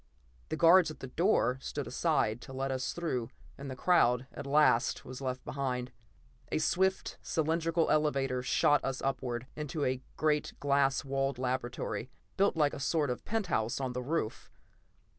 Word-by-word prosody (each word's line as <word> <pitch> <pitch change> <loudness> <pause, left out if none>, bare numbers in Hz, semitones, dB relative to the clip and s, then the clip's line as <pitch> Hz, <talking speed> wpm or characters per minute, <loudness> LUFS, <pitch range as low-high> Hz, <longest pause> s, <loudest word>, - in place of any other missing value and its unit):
The 160 - -2
guards 170 +1 +6
at 155 - -9
the - - -6
doors 135 -6 +1
stood - - -4
aside 110 +3 0
to 130 - -10
let 135 +1 -2
us 130 -1 -2
through 130 -9 -2 0.3
and 140 0 -8
the 130 - -5
crowd 125 -5 +3
at 145 - -7
last 140 -5 +3
was 130 +1 -8
left 130 -1 -3
behind. 125 -2 -3 0.6
A - - +1
swift, 190 +4 0
cylindrical 165 +1 0
elevator 135 -4 +1
shot 145 +3 +3
us 135 -1 -3
upward, 125 -3 -2
into 150 0 -3
a 130 0 -1 0.2
great 150 -1 +1
glass 140 -1 +2
walled 135 -1 -1
laboratory, 125 -1 -3 0.3
built 200 -1 +2
like 150 -2 +3
a - - -5
sort 145 0 +1
of 125 - -5
penthouse 175 - -1
on 130 -2 -2
the 125 - -3
roof. 135 -4 -3
135 Hz, 160 wpm, -31 LUFS, 125-155 Hz, 0.6 s, guards